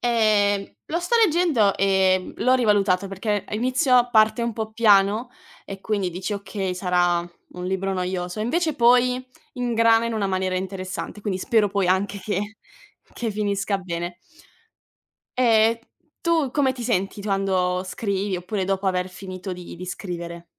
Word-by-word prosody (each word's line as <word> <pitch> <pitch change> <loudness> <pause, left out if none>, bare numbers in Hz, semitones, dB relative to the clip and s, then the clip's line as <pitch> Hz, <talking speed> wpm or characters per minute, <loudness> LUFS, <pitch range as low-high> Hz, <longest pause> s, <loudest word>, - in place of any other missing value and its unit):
Ehm, 210 -4 +2 0.2
lo 340 +3 -2
sto 355 +7 +1
leggendo, 310 - +2
ehm, 190 -1 +2
l'ho 255 - +2
rivalutato 200 -5 +2
perché 200 +1 -2
a - - -4
inizio 250 +1 +3
parte 220 +1 +4
un 235 - -1
po' 220 0 -5
piano 215 +1 +3 0.3
e 195 -1 -8
quindi 200 -3 -1
dici: 185 +4 -4
"Okay, 195 -2 -4
sarà 175 -1 +1 0.3
un 180 - -7
libro 190 +1 -1
noioso". 180 +1 -3
E - - 0
invece 315 +5 0
poi 250 +1 +3 0.3
ingrana 230 -2 +3
in 230 - -3
una 210 -2 0
maniera 185 -1 -1
interessante, 190 +2 -5
quindi 190 -3 -2
spero 215 +1 +2
poi 200 -2 0
anche 200 +2 +1
che 205 +2 -3 0.6
che 235 -2 -3
finisca 200 -1 -1
bene. 175 -1 -5 1.2
Ehm, 230 -2 +4 0.4
tu 325 -5 +1
come 270 -1 +2
ti 250 -2 -8
senti 200 -4 -1
quando 190 -3 0
scrivi 195 0 -2
oppure 185 +2 -3
dopo 195 +1 -1
aver 185 -1 0
finito 185 0 -7
di 180 -1 -9
di 180 +1 -8
scrivere? 170 -2 -6
200 Hz, 150 wpm, -23 LUFS, 185-230 Hz, 1.2 s, parte